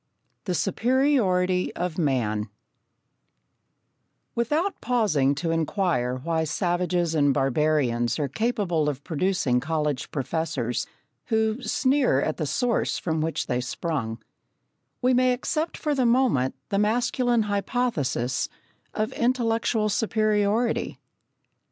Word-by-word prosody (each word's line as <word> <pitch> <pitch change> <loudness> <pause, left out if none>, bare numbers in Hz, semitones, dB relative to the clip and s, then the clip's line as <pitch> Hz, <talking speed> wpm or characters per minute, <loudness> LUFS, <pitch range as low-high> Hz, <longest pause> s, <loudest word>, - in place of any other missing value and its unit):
The 180 -3 -1
Superiority 195 - +2
of 175 -1 -3
Man 115 -8 0 1.8
Without 300 - 0
pausing 195 - +2
to 165 +4 -2
inquire 165 - 0
why 160 +5 -1
savages 175 0 0
and 145 -3 +3
barbarians 135 -4 +1
are 145 -3 0
capable 175 - 0
of 140 -1 -5
producing 165 -6 +1
college 150 -1 -2
professors, 140 -4 -2 0.4
who 220 +2 0
sneer 255 - +2
at 155 +2 -1
the 155 - -2
source 245 - 0
from 160 -2 -1
which 160 +1 -1
they 125 0 -1
sprung, 125 -4 -3 0.9
we 255 +1 +4
may 255 0 +4
accept 310 +6 -2
for 300 -2 -1
the 260 -3 +2
moment 235 - +2
the 200 -2 +1
masculine 240 +2 +2
hypothesis 200 - -1 0.5
of 215 +1 -1
intellectual 230 -2 +1
superiority. 215 +1 +1
180 Hz, 110 wpm, -25 LUFS, 145-235 Hz, 1.8 s, we